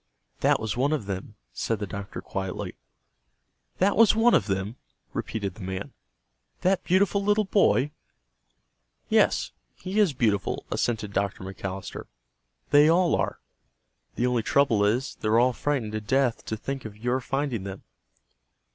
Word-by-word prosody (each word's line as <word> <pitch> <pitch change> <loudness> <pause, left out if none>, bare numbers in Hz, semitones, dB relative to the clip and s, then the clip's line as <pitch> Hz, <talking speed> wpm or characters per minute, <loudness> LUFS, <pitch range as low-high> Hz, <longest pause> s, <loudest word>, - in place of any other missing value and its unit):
"That - - +3
was 110 -2 -2
one 140 +5 +1
of 145 -9 -2
them," 95 -2 -5 0.2
said 115 - -1
the 105 - -3
doctor 100 +1 -6
quietly. 95 -1 -4 1.0
"That 195 +2 +3
was 225 -1 +6
one 230 +2 +5
of 100 - +3
them!" 100 +4 -2 0.4
repeated 100 -4 -3
the 105 - -13
man. 95 0 -5 0.7
"That 190 +1 +2
beautiful 200 +2 +2
little 210 +1 +3
boy?" 150 -8 +3 1.2
"Yes, 60 +3 +3 0.2
he 190 +3 -3
is 200 -8 +4
beautiful," 105 -6 0
assented 110 -4 -1
Dr. 100 -1 -1
McAllister. 95 0 -6 0.7
"They 145 +2 +7
all 175 +1 +4
are. - - -2 0.7
The 120 - 0
only 125 -2 +2
trouble 115 -3 +3
is, 120 +7 0
they're 110 +1 +2
all 125 +2 +4
frightened 130 -4 -1
to 110 0 -3
death 130 +2 +1
to 110 - -3
think 135 +3 -5
of 105 -2 -9
your 125 +4 0
finding 135 -4 -2
them." 95 0 -7
115 Hz, 145 wpm, -26 LUFS, 100-145 Hz, 1.2 s, They